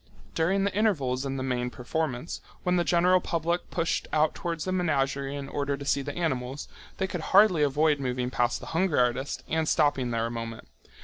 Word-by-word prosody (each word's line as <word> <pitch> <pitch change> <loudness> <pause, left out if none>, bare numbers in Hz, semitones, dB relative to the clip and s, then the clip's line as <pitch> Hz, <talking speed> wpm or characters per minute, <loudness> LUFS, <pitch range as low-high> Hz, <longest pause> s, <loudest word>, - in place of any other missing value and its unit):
During 190 +4 +1
the 200 - 0
intervals 140 - +1
in 135 0 -3
the 130 - -3
main 125 -1 -1
performance, 130 +3 -3 0.2
when 180 0 +2
the 175 - +3
general 180 +1 +4
public 170 +1 -1
pushed 165 -1 -1
out 155 0 +2
towards 170 -4 -3
the 185 - -1
menagerie 140 -6 0
in 140 -1 -5
order 140 0 -2
to 140 - -8
see 140 0 +1
the 145 +3 -6
animals, 135 -4 -2 0.3
they 190 - 0
could 185 -3 -4
hardly 190 -2 +5
avoid 150 +1 +3
moving 125 -1 -2
past 120 -1 +1
the - - -8
hunger 170 -1 +1
artist 125 +3 0
and 160 0 0
stopping 145 -5 +2
there 115 -1 0
a 115 - -3
moment. 115 -1 -6
145 Hz, 195 wpm, -27 LUFS, 130-170 Hz, 0.3 s, hardly